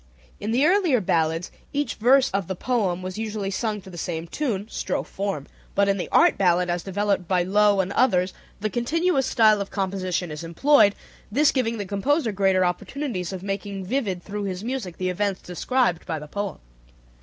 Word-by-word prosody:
In 210 - -4
the 250 +6 +3
earlier 350 - +4
ballads 165 -3 0 0.2
each 290 0 -1
verse 260 +4 +4
of 195 -2 -1
the 190 - -3
poem 190 -5 -1
was 185 +2 -5
usually 210 -3 -3
sung 210 0 -2
to 190 - -12
the 175 - -8
same 165 -1 -3
tune 210 - -2
(strophe - - -3
form), 195 -8 -3 0.3
but 200 0 +3
in 200 0 +2
the - - -4
art - - +5
ballad 180 -1 +3
as 175 0 -1
developed 195 -1 -1
by 180 -1 +2
Loewe 205 +1 +4
and 185 - -6
others 190 -7 +2 0.3
the 215 0 -1
continuous 275 - +1
style 215 -5 +4
of 200 - -4
composition 185 -3 -2
is 150 +2 -6
employed, 205 - +4 0.4
this 290 +6 +4
giving 230 -3 0
the 205 - -3
composer 225 - 0
greater 190 -2 +2
opportunities 185 - -3
of 190 -1 -6
making 195 -1 -4
vivid 195 -6 -2
through 205 0 -4
his 185 0 -4
music 235 -8 -4
the 185 0 -1
events 195 +1 -1
described 180 0 0
by 160 - -2
the 150 0 -8
poem. 200 +4 -4
200 Hz, 190 wpm, -24 LUFS, 180-235 Hz, 0.4 s, art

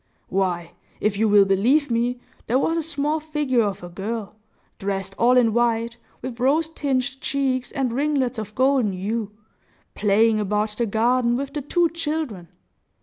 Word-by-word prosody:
Why, 175 -3 -1 0.3
if 210 -1 +1
you 220 +1 +2
will 205 -1 +6
believe 240 +9 +2
me, 240 +2 0 0.3
there 245 - +2
was 325 +4 +1
a 335 - +1
small 300 0 -1
figure 300 -5 0
of 200 -4 -2
a - - -6
girl, 205 +4 -5 0.5
dressed 195 -1 -3
all 245 +2 +5
in 230 -3 +4
white, 235 0 +1 0.3
with 245 -2 -6
rose 300 +6 +2
tinged 265 -4 -2
cheeks 265 -2 -1
and 265 -5 -1
ringlets 265 -3 0
of 215 0 -7
golden 260 -5 +2
hue, 205 +3 -3 0.6
playing 215 +2 +3
about 210 +1 0
the 230 +2 -1
garden 235 +3 +2
with 275 +1 -4
the 295 - -3
two 340 +5 +2
children! 305 - -3
240 Hz, 160 wpm, -23 LUFS, 210-275 Hz, 0.6 s, will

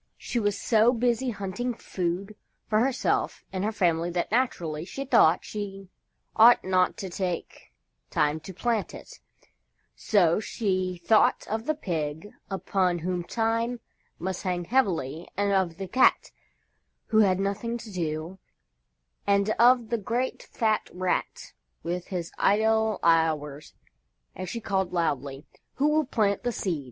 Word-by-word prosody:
She 240 - -3
was 205 -2 0
so 225 +1 +4
busy 245 +1 +1
hunting 225 +3 -3
food 185 +3 -3 0.3
for 215 0 +2
herself 260 +2 0
and 190 0 -2
her 215 - 0
family 175 -5 +1
that, 175 +2 -2
naturally, 170 -11 0
she 270 +9 -6
thought 165 -10 +4
she 195 -2 -6 0.5
ought 230 +2 +7
not 185 -1 +2
to 190 - -5
take 180 -1 -4 0.4
time 150 +1 +1
to 190 - -9
plant 225 +3 -2
it. - - -12 0.8
So 180 -5 +3
she 185 -5 -2
thought 220 -1 +4
of 220 +2 -3
the 310 - +1
Pig 160 - -4 0.2
upon 190 -2 0
whom 175 +1 -2
time 230 +4 -1 0.4
must 185 +1 -4
hang 180 -2 -2
heavily 170 - 0
and 200 0 +1
of 185 -4 +1
the 195 -1 -5
Cat 255 +8 +3 0.8
who 220 - +4
had 190 -3 +4
nothing 205 +4 -2
to 225 -2 -10
do, 165 +1 -4 0.9
and 200 +1 +3
of 240 -1 +5
the 235 - +1
great 240 +5 -2
fat 220 -2 -1
Rat 185 0 -2 0.3
with 175 +1 -3
his 175 -3 -4
idle 220 +1 +2
hours, 155 -3 +1 0.6
and 185 -1 -5
she 235 - -4
called 190 -4 -1
loudly: 145 -4 -2 0.3
"Who 290 +3 +2
will 310 0 +2
plant 210 -6 +1
the 245 - -1
Seed?" 180 -8 -2
195 Hz, 145 wpm, -27 LUFS, 175-225 Hz, 0.9 s, ought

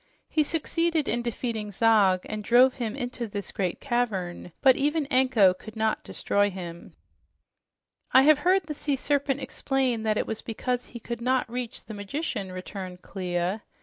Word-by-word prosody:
He 310 - +2
succeeded 325 0 0
in 240 +2 0
defeating 230 -3 -3
Zog 200 -3 +4
and 215 -1 -5
drove 250 +4 +5
him 235 -2 -3
into 245 -3 -4
this 200 -3 -5
great 185 -3 -2
cavern, 205 -10 -2
but 265 -2 +6
even 295 +2 +1
Anko 255 -8 +5
could 220 +4 -12
not 220 0 0
destroy 205 0 +1
him." 175 -3 -8 1.2
"I 260 - +7
have 300 0 +6
heard 370 +4 +3
the 305 -1 -5
sea 290 -1 -1
serpent 280 0 0
explain 265 -3 -1
that 215 -1 +1
it - - 0
was 220 - -4
because 245 +2 -2
he 235 - -10
could 235 +1 -6
not 255 +1 +1
reach 245 +1 -5
the 220 - -8
magician," 205 - -4
returned 185 0 -7
Clia. 180 +1 -2
235 Hz, 165 wpm, -27 LUFS, 205-265 Hz, 1.2 s, I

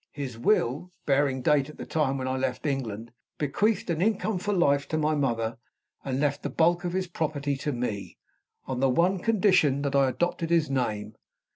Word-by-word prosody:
His 135 -5 -5
will, 135 - +1
bearing 135 -2 +1
date 145 0 +3
at 150 - -12
the - - -6
time 140 -4 0
when 130 -1 -3
I 130 - -1
left 130 +1 -2
England, 120 -6 -3 0.3
bequeathed 195 +9 0
an 165 0 -1
income 210 -1 +1
for 205 +3 -2
life 140 -7 +2
to 155 - -1
my 155 0 +1
mother, 115 -6 -1 0.4
and 135 -1 -2
left 145 -1 0
the - - -3
bulk 170 +2 +2
of 175 -1 -2
his 190 0 0
property 150 -4 -2
to 145 +2 -2
me, 120 -6 -4 0.5
on 130 -2 -3
the 135 0 +3
one 175 +8 +2
condition 180 - +3
that 140 -1 -1
I 135 -1 +4
adopted 175 +3 -1
his 165 -4 +2
name. 110 -5 -1
145 Hz, 190 wpm, -27 LUFS, 130-170 Hz, 0.5 s, I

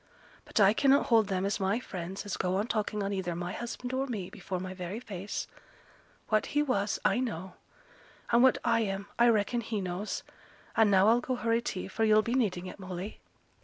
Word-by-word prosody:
But - - -1
I 200 0 +6
cannot 275 +4 +4
hold 225 -3 +4
them 190 -1 -1
as 200 +2 -1
my 195 +4 +1
friends 190 -3 -6
as 205 - -3
go 185 0 0
on 200 +2 +1
talking 210 -2 -1
on 200 +1 -2
either 180 -3 -2
my 175 +1 -3
husband 245 +1 -5
or 265 +1 0
me 205 -8 -4
before 185 -2 -5
my 185 +1 -5
very 185 +3 -5
face. 200 -4 -5 0.8
What 215 -1 +2
he 295 - +5
was, 210 -7 0
I - - +3
know; 190 -7 -3 0.8
and 235 0 +5
what 260 0 +6
I 230 -1 +3
am, 200 -2 -2
I 240 0 +6
reckon 230 +2 +2
he 220 -2 -3
knows. 185 +2 -3 0.5
And 220 -2 +5
now 195 0 +5
I'll 235 +2 +4
go 255 +1 -2
hurry 230 -1 +1
tea, 190 -6 -4
for 225 +4 -2
yo'll 215 0 +5
be 235 - -2
needing 195 -8 0
it, 185 - -8
Molly!' 185 +2 -6
205 Hz, 205 wpm, -30 LUFS, 190-235 Hz, 0.8 s, I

